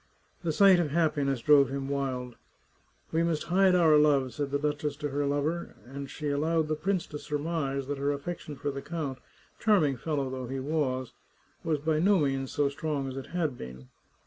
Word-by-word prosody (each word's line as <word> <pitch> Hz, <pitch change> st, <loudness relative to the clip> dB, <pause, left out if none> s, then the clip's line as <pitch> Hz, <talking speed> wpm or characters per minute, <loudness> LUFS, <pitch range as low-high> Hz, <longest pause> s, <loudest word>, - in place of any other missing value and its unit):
The 170 Hz, -3 st, -1 dB
sight 190 Hz, +2 st, +6 dB
of 165 Hz, -4 st, 0 dB
happiness 145 Hz, -5 st, +1 dB
drove 140 Hz, -2 st, +6 dB
him 135 Hz, 0 st, -3 dB
wild. 130 Hz, -3 st, -2 dB, 0.8 s
'*We 160 Hz, -, +2 dB
must 165 Hz, -2 st, 0 dB
hide 185 Hz, +2 st, +4 dB
our 160 Hz, -4 st, +6 dB
love," 140 Hz, -4 st, +3 dB
said 145 Hz, +1 st, -2 dB
the 140 Hz, -, 0 dB
duchess 150 Hz, 0 st, -2 dB
to 145 Hz, +1 st, -4 dB
her 145 Hz, +1 st, -1 dB
lover, 145 Hz, +4 st, -1 dB
and 135 Hz, +2 st, -7 dB
she 150 Hz, -2 st, -4 dB
allowed 155 Hz, +2 st, +1 dB
the 155 Hz, -, +1 dB
prince 185 Hz, +2 st, -1 dB
to 150 Hz, -, -7 dB
surmise 145 Hz, -3 st, -2 dB
that 140 Hz, 0 st, -4 dB
her 140 Hz, +1 st, +1 dB
affection 150 Hz, +1 st, -5 dB
for 140 Hz, +1 st, -3 dB
the 140 Hz, 0 st, -5 dB
count, 150 Hz, -5 st, -4 dB, 0.4 s
charming 170 Hz, -, +3 dB
fellow 145 Hz, 0 st, -2 dB
though 130 Hz, -1 st, -5 dB
he 135 Hz, +2 st, -4 dB
was, 130 Hz, -3 st, -1 dB, 0.5 s
was 160 Hz, -2 st, +1 dB
by 155 Hz, +1 st, 0 dB
no 195 Hz, +4 st, +4 dB
means 135 Hz, -4 st, 0 dB
so 145 Hz, -1 st, +2 dB
strong 140 Hz, -1 st, -2 dB
as 130 Hz, -, -7 dB
it 135 Hz, -, -6 dB
had 160 Hz, -7 st, -2 dB
been. 65 Hz, 0 st, -9 dB
145 Hz, 195 wpm, -29 LUFS, 135-160 Hz, 0.8 s, sight